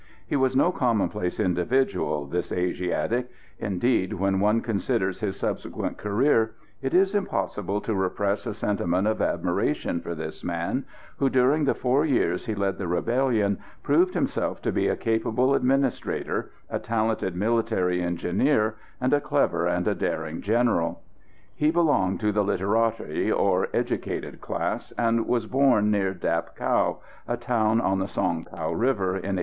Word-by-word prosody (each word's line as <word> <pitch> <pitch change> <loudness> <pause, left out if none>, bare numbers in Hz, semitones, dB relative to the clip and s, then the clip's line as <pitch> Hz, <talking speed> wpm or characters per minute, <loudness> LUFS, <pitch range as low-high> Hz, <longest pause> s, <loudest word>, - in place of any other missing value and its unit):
He - - -2
was 130 -1 +2
no 170 +7 +4
commonplace 105 - 0
individual, 90 - +1
this 85 +5 -3
Asiatic; 90 +7 -1 0.3
indeed, 95 0 0
when 95 +1 +1
one 105 +3 +3
considers 105 -3 -1
his 100 -3 -2
subsequent - - -3
career, 110 +1 +2 0.3
it 135 - -1
is 190 +2 +4
impossible 105 - -1
to 110 - -2
repress 100 +2 -1
a 110 - -3
sentiment 100 -3 0
of 110 - 0
admiration 85 - 0
for 85 0 -5
this 80 0 -7
man, - - -2 0.3
who, 135 - +2
during 130 +4 +3
the - - +2
four 130 +3 +2
years 120 - +1
he 110 - -1
led 100 -1 -1
the 95 - -3
rebellion, 110 +1 +1 0.2
proved 175 +6 +3
himself - - -1
to - - +1
be - - +1
a - - +1
capable 115 +4 +1
administrator, 135 +1 0 0.2
a - - -3
talented 110 -5 -1
military 105 -3 +1
engineer, 105 - +1 0.2
and 130 +2 +1
a 145 - +3
clever 115 - +1
and 90 - 0
a - - +3
daring 80 0 -3
general. 105 -7 +1 0.5
He 150 - +2
belonged 150 - +2
to 105 -1 +2
the 105 0 +2
literati, 105 -2 0
or - - +2
educated - - -3
class, - - -3
and 115 -1 +1
was 120 -2 +1
born 125 -4 +3
near 100 -2 +1
Dap 85 -1 -2
Cau, - - +1 0.3
a 120 - -1
town 115 -2 +1
on 95 -4 +1
the 95 - -1
Song 85 -4 -1
Cau 80 -2 -4
river, 110 -3 +1
in 95 +1 -2
1836. - - 0
105 Hz, 155 wpm, -26 LUFS, 95-125 Hz, 0.5 s, no